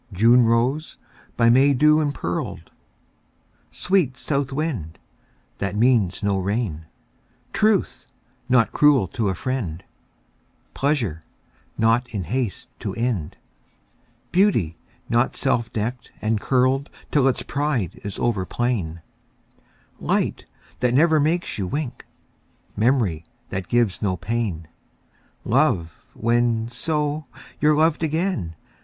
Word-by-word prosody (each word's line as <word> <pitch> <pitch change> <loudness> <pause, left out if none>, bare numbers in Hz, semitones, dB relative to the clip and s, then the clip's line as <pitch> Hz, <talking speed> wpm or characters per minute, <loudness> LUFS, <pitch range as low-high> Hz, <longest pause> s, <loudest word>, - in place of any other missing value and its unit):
June 115 +6 +5
rose, 125 +7 +1 0.4
by 115 - +4
May 135 +3 +5
dew 150 +3 +5
impearled; 140 - -3 1.0
Sweet 175 -9 0
south 140 0 -1
wind, 135 - -3 0.6
that 100 0 -2
means 110 -5 +2
no 100 -1 +1
rain; 95 -5 -2 0.7
Truth, 215 -2 +1 0.4
not 125 -3 +4
cruel 145 -9 +4
to 110 -1 -1
a 95 - -1
friend; 95 -7 -3 0.9
Pleasure, 125 - 0 0.6
not 115 +2 +2
in 100 -4 -4
haste 115 - -3
to - - -4
end; 115 -10 -2 0.9
Beauty, 170 - +2 0.3
not 120 +2 +1
self 120 -4 0
decked 115 +3 -4
and 110 -1 0
curled 130 +2 +2 0.2
Till 140 -3 +3
its 130 - 0
pride 140 - -2
is 100 -2 -5
over 110 -6 0
plain; 90 -7 -2 1.0
Light, - - -1 0.3
that 125 0 +1
never 160 +2 +5
makes 160 -2 0
you 95 - -1
wink; 145 +4 -4 0.7
Memory, 110 - +1 0.3
that 90 -1 -4
gives 120 -5 +1
no 95 -3 0
pain; 90 -4 -3 0.8
Love, 105 - +2 0.2
when, 115 0 +1
so, 150 +3 -2 0.3
you're 150 0 +4
loved 160 0 +3
again. 160 - -1
120 Hz, 110 wpm, -23 LUFS, 100-145 Hz, 1.0 s, June